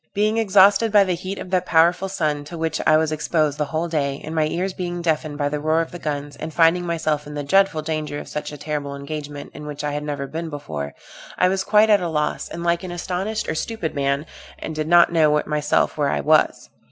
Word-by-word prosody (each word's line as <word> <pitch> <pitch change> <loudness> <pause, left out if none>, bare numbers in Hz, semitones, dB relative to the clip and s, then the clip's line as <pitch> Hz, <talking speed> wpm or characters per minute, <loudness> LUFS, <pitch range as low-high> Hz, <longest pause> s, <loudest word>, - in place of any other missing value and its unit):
Being 215 +2 +2
exhausted 205 +1 +5
by 205 -1 +6
the 185 -2 0
heat 185 +3 -5
of 185 - -8
that 185 -1 +1
powerful 170 +3 +3
sun, 155 -6 -1
to 170 +3 -8
which 160 -1 -1
I 155 - +6
was 160 0 +1
exposed 155 -1 0
the 150 - +1
whole 160 +3 -2
day, 140 -4 -1
and 155 - -6
my 155 -1 +2
ears 185 +4 -2
being 175 -1 -4
deafened 155 -2 -1
by 145 -1 0
the 150 +1 -2
roar 155 +2 +1
of 165 - -2
the 175 - -8
guns, 145 -2 -4
and 160 - -6
finding 170 +2 +3
myself 155 -3 -1
in 150 - -8
the 145 - -3
dreadful 190 0 +2
danger 155 -2 -3
of - - -7
such 150 0 -5
a 150 - -8
terrible 145 -1 -4
engagement, 145 0 -7
in 150 0 -9
which 150 0 -6
I 145 - -1
had 145 +1 -3
never 145 -2 -3
been 160 +4 -5
before, 75 - -6 0.4
I 180 - +4
was 190 0 0
quite 215 +2 +4
at 205 -2 +5
a 175 - -2
loss, 150 -1 -2
and 170 - -6
like 170 0 +1
an 185 - -6
astonished 185 +5 -3
or - - -1
stupid 175 0 -3
man, 140 +1 0 0.3
and 160 - -6
did 155 0 -3
not 170 0 +5
know 155 -2 +4
myself 150 0 0
where 145 - +2
I 75 - 0
was. - - +2
155 Hz, 240 wpm, -22 LUFS, 150-175 Hz, 0.4 s, by